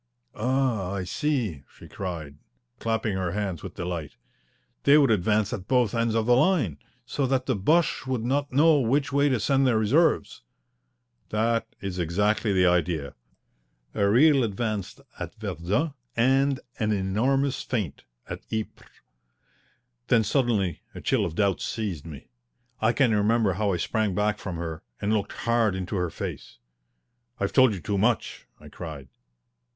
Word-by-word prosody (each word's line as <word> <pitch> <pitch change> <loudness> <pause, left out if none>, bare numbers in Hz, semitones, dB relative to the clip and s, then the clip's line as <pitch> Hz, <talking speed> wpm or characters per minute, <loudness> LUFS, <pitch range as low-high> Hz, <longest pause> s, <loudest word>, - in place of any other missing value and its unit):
"Ah, 120 -5 0
I 95 -2 -2
see," 115 - -1 0.2
she - - -12
cried, 80 -6 -6 0.4
clapping 110 -2 -1
her 90 -2 -2
hands 100 -5 -3
with - - -8
delight. 85 -4 -4 0.7
"They 140 +1 +6
would 140 -5 +4
advance 105 +1 +1
at 95 -1 -5
both 125 -5 +2
ends 115 -1 0
of 110 -1 +1
the 120 +1 +5
line, 130 - +2 0.3
so 140 -2 -1
that 130 -1 0
the 130 - 0
Boches 155 - +1
would 130 -4 -1
not 140 +4 0
know 150 +3 +5
which 140 +4 +1
way 140 +1 +3
to 130 -4 +1
send 135 +4 +2
their 120 -3 +3
reserves." 140 +11 +2 0.9
"That 115 +2 0
is 95 -2 -4
exactly 105 +6 +1
the 95 -1 +3
idea 85 -5 +1 0.8
a 100 0 +2
real 135 +4 +5
advance 110 -2 -3 0.2
at - - -6
Verdun, 105 - -2 0.2
and 135 +3 +3 0.2
an 110 -2 +1
enormous 120 +8 +1
feint 105 - -3 0.2
at - - -6
Ypres." 110 -1 -5 1.2
Then 115 -3 +4
suddenly 105 - 0
a - - -7
chill - - +1
of 80 - -7
doubt 100 -1 +1
seized 100 -9 -4
me. 75 -6 -11 0.5
I 110 +1 +4
can 120 -2 +2
remember 105 -1 +2
how 100 +2 0
I 90 - 0
sprang 105 +1 -1
back 105 +1 0
from 95 -3 -5
her 80 -1 -5 0.2
and 105 +2 0
looked 105 -2 -1
hard 115 -4 +2
into 95 +2 -4
her 90 -1 0
face. 60 - -7 0.8
"I've 100 - -1
told 130 -6 +5
you - - -6
too 100 +5 -2
much!" 110 +3 0
I - - -13
cried. 75 -6 -8
110 Hz, 155 wpm, -26 LUFS, 95-130 Hz, 1.2 s, They